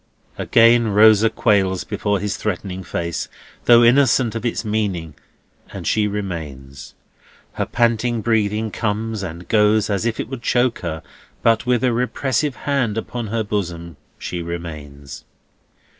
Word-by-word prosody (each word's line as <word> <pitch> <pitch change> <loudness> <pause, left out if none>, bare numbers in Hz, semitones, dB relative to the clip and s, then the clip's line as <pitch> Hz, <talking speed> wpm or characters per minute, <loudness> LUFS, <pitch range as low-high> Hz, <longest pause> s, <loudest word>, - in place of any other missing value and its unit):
Again 115 0 +4
Rosa 110 +1 +5
quails 95 -4 +1
before 105 -1 -1
his 105 -1 -2
threatening 95 -2 -4
face, 85 -2 -4 0.4
though 120 0 +7
innocent 120 -2 +4
of 115 - -5
its 120 -1 -2
meaning, 100 -7 -2 0.6
and - - -8
she 105 -1 +1
remains. 75 -10 -6 0.6
Her - - -3
panting 120 0 +1
breathing 110 -1 0
comes 110 0 -2
and 90 -2 -7
goes 105 0 +3
as 100 0 0
if 115 - -3
it - - -3
would 130 -1 -7
choke 120 0 +1
her; 80 -2 -5 0.4
but 115 +1 +2
with 125 -1 +2
a 125 -2 +2
repressive 130 +3 -1
hand 125 -7 0
upon 115 0 -4
her 115 +1 -1
bosom, 85 -5 -4 0.2
she 90 - -5
remains. 75 -5 -8
105 Hz, 140 wpm, -20 LUFS, 90-115 Hz, 0.6 s, though